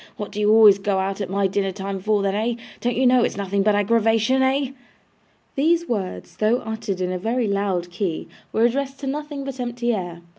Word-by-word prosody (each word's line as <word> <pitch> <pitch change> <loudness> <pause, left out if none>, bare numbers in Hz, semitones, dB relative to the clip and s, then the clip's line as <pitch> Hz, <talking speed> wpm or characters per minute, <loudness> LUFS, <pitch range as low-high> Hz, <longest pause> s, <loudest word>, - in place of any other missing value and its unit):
What 210 - -6
do 205 - -5
you 210 0 +2
always 215 -3 +7
go 195 0 0
out 195 +1 -2
at 190 - -3
my 200 +1 0
dinner 195 0 0
time 195 0 -5
for 210 +1 +1
then 195 -1 0
eh? 225 +3 0 0.2
Don't 245 0 -1
you 260 - +2
know 250 -1 +5
it's - - -1
nothing 200 0 -1
but 210 +1 +3
aggravation 225 +4 +2
eh?' 265 0 +1 0.8
These 335 +4 +2
words, 200 -6 -4
though 215 +3 +2
uttered 220 -4 -4
in 180 0 -1
a 185 - -3
very 230 +4 0
loud 195 -3 -1
key, 175 -2 -3 0.2
were 225 - +1
addressed 270 +3 -1
to - - -4
nothing 290 0 -4
but 270 -1 -6
empty 240 -1 -1
air. 175 -4 -4
215 Hz, 215 wpm, -22 LUFS, 195-245 Hz, 0.8 s, always